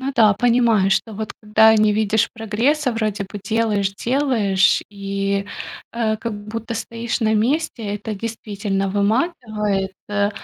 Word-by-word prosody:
Ну 275 +1 -3
да, 220 -4 +6
понимаю, 230 -4 +3
что 225 - 0
вот 215 +1 -5
когда 220 +1 +5
не 215 -1 +4
видишь 215 0 +2
прогресса, 240 +5 0
вроде 215 -3 -2
бы 200 +1 -8
делаешь, 215 -3 0
делаешь, 225 -8 +2
и, 200 0 -2 0.5
а, 220 -2 0
как 225 0 -4
будто 230 +1 -5
стоишь 230 +1 -3
на 220 -1 +2
месте. 230 -3 0
Это 215 +1 -5
действительно 205 -2 -3
выматывает. 210 - 0 0.2
Э, 205 0 +1
215 Hz, 140 wpm, -21 LUFS, 205-230 Hz, 0.5 s, да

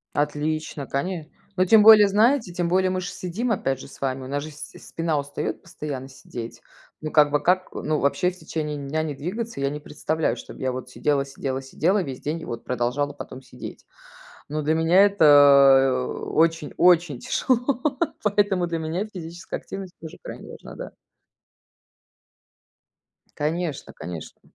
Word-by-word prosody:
Отлично, 150 0 -2
коне 160 +2 -3 0.3
но 185 - +4
тем 215 +2 +6
более, 215 -2 +9
знаете, 215 -1 +2
тем 175 -1 -1
более 185 +1 +3
мы 185 0 -1
ж 180 - -4
сидим 210 +8 -3
опять 135 - -1
же - - -10
с - - -15
вами, 130 -1 -2
у - - -7
нас 140 +1 -2
же 155 - -8
с 145 - -9 0.2
спина 165 -3 -1
устает 140 0 -4
постоянно 135 -3 -6
сидеть. 120 -3 -9 0.4
Ну, 155 - -4
как 150 -1 +5
бы 145 0 0
как 185 +1 +2
ну, 155 -1 -1
вообще 180 +6 +1
в 180 - -15
течение 150 -2 -4
дня 145 +3 -2
не 150 -2 -3
двигаться, 215 - -5
я 140 0 +1
не 150 +1 -5
представляю, 155 +2 -2
чтоб - - -10
я 130 -1 -1
вот 130 0 -6
сидела 140 -2 0
сидела 135 -1 -4
сидела 180 +9 +1
весь 135 -4 -7
день 155 +3 -3
и - - -7
вот 115 -1 -6
продолжала 125 +4 -1
потом 130 -2 -9
сидеть. 130 - -10 0.6
Но 155 +1 -2
для 155 +2 +2
меня 165 +4 +5
это, 140 -7 +6
очень, 165 -1 0
очень 170 -7 +4
тяжело, 250 0 0 0.4
поэтому 200 -3 +2
для 165 -1 -2
меня 165 +6 -2
физическая 175 +1 -6
активность 195 -2 -8
тоже 160 - -9
крайне - - -9
важна, - - -11
да. - - -7 2.4
Конечно, 155 0 -3
конечно. 80 -2 -8
155 Hz, 165 wpm, -24 LUFS, 140-180 Hz, 2.4 s, более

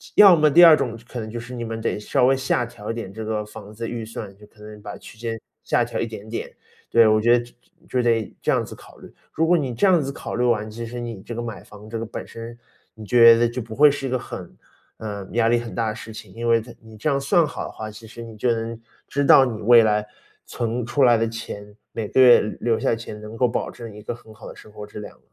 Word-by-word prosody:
要 200 -4 +9
么 155 -2 +4
第 170 +5 +7
二 165 -2 +9
种 120 -4 -3
可 125 - -6
能 110 -1 -6
就 120 +2 -5
是 120 +2 -9
你 120 -1 -5
们 115 -1 -5
得 110 - -2
稍 125 +4 +1
微 135 +1 +4
下 130 -2 0
调 110 -2 -7
一 - - -3
点 115 -5 -6
这 110 +1 -6
个 110 -1 -2
房 105 0 -11
子 115 +2 -5
预 115 -2 -5
算， 110 -2 -8
就 105 - -15
可 105 0 -22
能 105 0 -11
把 - - -8
区 - - -14
间 115 0 -4 0.2
下 - - +2
调 120 - -4
一 115 - -1
点 110 -2 -9
点。 115 - -5 0.4
对， 115 -1 +6
我 110 0 +4
觉 120 +2 +5
得 120 - -3
就 120 - -17 0.4
就 125 - +1
得 115 -3 +1
这 - - +1
样 - - +1
子 - - -9
考 - - -17
虑。 - - -14 0.2
如 160 +1 0
果 175 +1 +4
你 135 -6 -2
这 120 - +2
样 180 -3 +5
子 140 -1 -3
考 - - -6
虑 125 - 0
完， 110 -3 +1
其 115 +2 -7
实 120 +2 -7
你 115 -5 -6
这 - - -7
个 120 - -4
买 115 -2 -7
房 105 +1 -14
这 115 - -4
个 115 - -4
本 110 - -7
身， 115 +1 -9 0.4
你 110 - -12
觉 115 +2 +8
得 120 0 +2
就 125 +2 -4
不 110 -1 -9
会 150 +3 +7
是 140 -1 -3
一 - - -2
个 130 - 0
很， 90 -6 -9 0.4
呃， 100 -3 -6
压 115 +1 +2
力 120 - +4
很 115 -1 -7
大 115 -2 -1
的 110 - -4
事 110 0 -9
情， 105 -3 -11
因 120 +1 -4
为 115 -1 +4
在 120 +1 -13
你 110 -1 -14
这 120 - -1
样 140 -1 +1
算 155 +4 +3
好 - - -6
的 - - -7
话， 110 - -7
其 110 +1 -12
实 115 +1 -11
你 115 -2 -10
就 120 +3 +1
能 115 0 -3 0.3
知 140 0 -1
道 135 - +8
你 115 -4 -4
未 120 +2 +7
来 105 -1 +1 0.4
存 120 0 -3
出 120 +4 -1
来 120 -2 +6
的 115 +1 0
钱， 105 -2 -8 0.2
每 110 -2 -3
个 130 - +4
月 125 -2 +8
留 105 - -4 0.2
留 - - -4
下 - - 0
的 - - +2
钱 110 -2 -9
能 105 +1 -9
够 125 - +3
保 120 - -3
证 115 -3 -10
一 105 - -11
个 - - -4
很 115 -2 -15
好 110 +1 -12
的 - - -10
生 110 - -15
活 105 0 -9
质 105 - -10
量。 105 - -10
115 Hz, 310 characters per minute, -22 LUFS, 110-120 Hz, 0.4 s, 要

